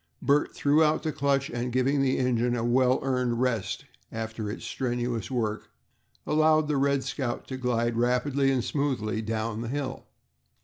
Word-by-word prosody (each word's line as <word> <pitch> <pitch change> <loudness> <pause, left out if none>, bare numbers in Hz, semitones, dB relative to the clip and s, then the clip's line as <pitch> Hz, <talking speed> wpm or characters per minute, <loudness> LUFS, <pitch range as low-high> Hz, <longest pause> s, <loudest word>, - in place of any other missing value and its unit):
Bert 145 +1 +1
threw 145 +3 +4
out 155 0 +2
the 160 - -1
clutch, 140 -2 0
and 120 +1 -3
giving 130 +3 +2
the 130 -1 +2
engine 125 -1 +1
a 115 - -2
well 125 +1 +3
earned 125 -3 0
rest 125 -5 -1 0.3
after 110 -1 -4
its 105 - -6
strenuous 120 -3 -2
work, 110 -4 -2 0.6
allowed 155 0 +3
the 150 -2 +1
"Red 140 0 +2
Scout" 130 -4 -3
to 130 - -3
glide 120 -2 0
rapidly 125 +4 +1
and 130 -3 +1
smoothly 120 -7 -1
down 110 0 -2
the 120 - -4
hill. 135 0 -4
125 Hz, 165 wpm, -27 LUFS, 120-140 Hz, 0.6 s, threw